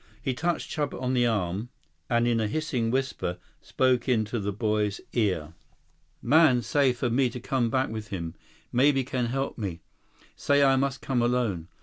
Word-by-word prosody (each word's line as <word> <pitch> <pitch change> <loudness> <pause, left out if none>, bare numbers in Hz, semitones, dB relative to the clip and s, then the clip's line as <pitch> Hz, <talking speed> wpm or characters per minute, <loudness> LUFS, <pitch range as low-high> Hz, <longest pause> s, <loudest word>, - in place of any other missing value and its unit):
He 130 - -2
touched 170 +5 -2
Chuba 150 -2 -2
on 130 0 -1
the 120 -1 +3
arm 105 0 -1 0.4
and 120 0 +2
in 115 -1 +2
a 110 - 0
hissing 125 -3 -1
whisper, 130 -8 -1 0.2
spoke 130 -1 +1
into 115 -1 +1
the 100 0 -2
boy's 105 -1 -1
ear. 90 -9 0 0.7
"Man 135 -2 +5
say 135 +4 +3
for 125 -1 -2
me 130 +1 +2
to 125 - -7
come 120 -1 0
back 130 +3 +1
with 110 -1 -6
him. 85 -5 -5 0.4
Maybe 135 +2 +3
can 125 -1 -2
help 135 +1 -3
me. 90 -6 -4 0.5
Say 145 0 +3
I 135 -1 +5
must 135 0 -1
come 130 -3 0
alone. 120 -9 0
120 Hz, 175 wpm, -27 LUFS, 110-135 Hz, 0.7 s, Man